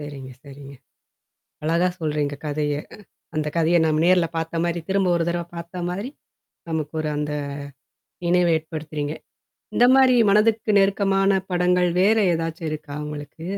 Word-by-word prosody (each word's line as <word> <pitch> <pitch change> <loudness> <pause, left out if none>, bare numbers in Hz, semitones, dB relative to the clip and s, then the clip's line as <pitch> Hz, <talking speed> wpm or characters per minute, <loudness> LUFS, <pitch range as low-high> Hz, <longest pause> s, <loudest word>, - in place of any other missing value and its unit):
சரிங்க 140 -3 -8
சரிங்க. 140 -1 -12 0.9
அழகா 170 +3 +2
சொல்றீங்க 150 -2 -1
கதைய. 150 0 -1 0.2
அ - - -10 0.4
அந்தக் 150 0 -2
கதைய 165 +1 +3
நம்ம 155 0 +1
நேர்ல 180 -1 +4
பாத்த 165 +1 -2
மாரி 170 0 -1
திரும்ப 195 -1 +2
ஒரு 170 - +1
தரவ 170 0 -1
பாத்த 170 +2 -7
மாதிரி, 200 +8 -4 0.6
நமக்கு 160 -1 -3
ஒரு 155 - -2
அந்த 150 0 -2 0.9
நினைவ 175 0 +3
ஏற்படுத்துறீங்க. 155 -2 -5 0.6
இந்த 245 - +5
மாரி 260 -2 +5
மனதுக்கு 215 +2 +3
நெருக்கமான 195 0 +2
படங்கள், 180 0 +2
வேற 210 +4 +4 0.2
ஏதாச்சும் 165 0 -3
இருக்கா, 150 -1 -6
உங்களுக்கு? 150 +2 -8
165 Hz, 135 wpm, -23 LUFS, 150-180 Hz, 0.9 s, இந்த